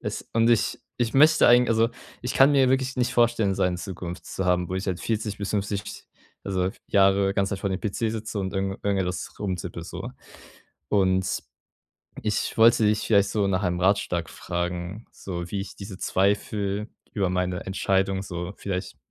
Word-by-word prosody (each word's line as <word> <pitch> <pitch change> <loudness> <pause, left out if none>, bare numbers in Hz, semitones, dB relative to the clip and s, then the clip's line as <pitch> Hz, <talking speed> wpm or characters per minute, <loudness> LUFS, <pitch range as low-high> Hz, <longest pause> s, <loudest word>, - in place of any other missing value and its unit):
es - - -5
und 115 +1 +4
ich 115 - +1 0.2
ich 120 0 0
möchte 155 +3 +6
eigen 125 0 +6
also, 115 0 +3 0.3
ich 125 - -3
kann 135 +2 +6
mir 135 -2 +4
wirklich 130 0 0
nicht 125 0 0
vorstellen, 120 -4 +3
so - - -1
eine 90 -1 +1
Zukunft 90 -1 -7
zu 95 - -3
haben, 90 -1 +2
wo 90 - -3
ich 95 - -4
halt 95 -2 -2
40 110 -2 -2
bis 100 -1 -3
50 100 0 -1 0.6
also 95 -2 0 0.2
Jahre 95 0 +4
ganze 100 0 +1
Zeit - - -12
vor 100 - -1
dem 95 - -2
PC 105 -3 -3 0.2
sitze 110 -1 -4
und 95 -1 -3
irgend 95 0 -2
irgendwas 95 -3 -1
rumtippe 90 -4 -4
so. - - -6 0.8
Und 95 -2 +1 0.8
ich 105 +1 -1
wollte 115 0 +6
dich 105 0 +2
vielleicht 100 -3 +4
so 105 -2 +1
nach 95 0 0
einem 90 0 0
Ratschlag 90 -3 +1
fragen, 90 +4 -4
so 85 -2 -6
wie 100 - -2
ich 100 - -10
diese 100 -1 -8
Zweifel 100 +2 0 0.3
über 95 -4 +1
meine 90 -1 -1
Entscheidung 95 0 0
so 90 -1 -5
vielleicht 95 -2 -4
100 Hz, 180 wpm, -25 LUFS, 90-110 Hz, 0.8 s, möchte